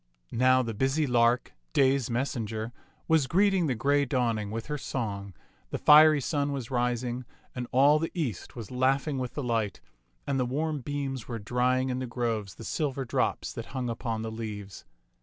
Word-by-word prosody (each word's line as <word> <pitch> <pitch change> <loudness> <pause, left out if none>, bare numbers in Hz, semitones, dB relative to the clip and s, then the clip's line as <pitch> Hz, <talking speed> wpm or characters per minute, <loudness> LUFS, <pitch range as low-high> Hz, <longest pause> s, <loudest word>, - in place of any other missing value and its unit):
Now 130 +2 +4
the 115 -2 -3
busy 135 +8 +1
lark, 120 -1 +2 0.2
day's 135 -2 +3
messenger, 115 -2 -2 0.3
was 160 -4 +3
greeting 190 -1 +3
the 130 - 0
gray 140 +5 +2
dawning 120 -6 0
with 115 +2 -4
her 150 -1 -4
song, 100 -8 -4 0.3
the - - -3
fiery 155 0 +7
sun 145 +2 0
was 135 -3 -4
ris 125 -1 0
ing, 125 +1 -3 0.3
and 125 -1 -4
all 140 +4 +5
the 165 - -1
east 135 - -3
was 115 -5 -8
laughing 135 +2 +1
with 125 -1 -4
the 145 - -2
light, 115 -4 -1 0.5
and 135 -1 0
the 125 - +2
warm 150 +3 -1
beams 135 -2 -4
were 120 - -4
drying 125 +4 +1
in 125 - -2
the 130 - -3
groves 115 -5 -2
the - - -10
silver 135 0 -2
drops 115 - -1
that - - -6
hung 125 -2 -1
upon 115 -1 -3
the 110 - -4
leaves. 105 - -7
125 Hz, 180 wpm, -28 LUFS, 115-140 Hz, 0.5 s, fiery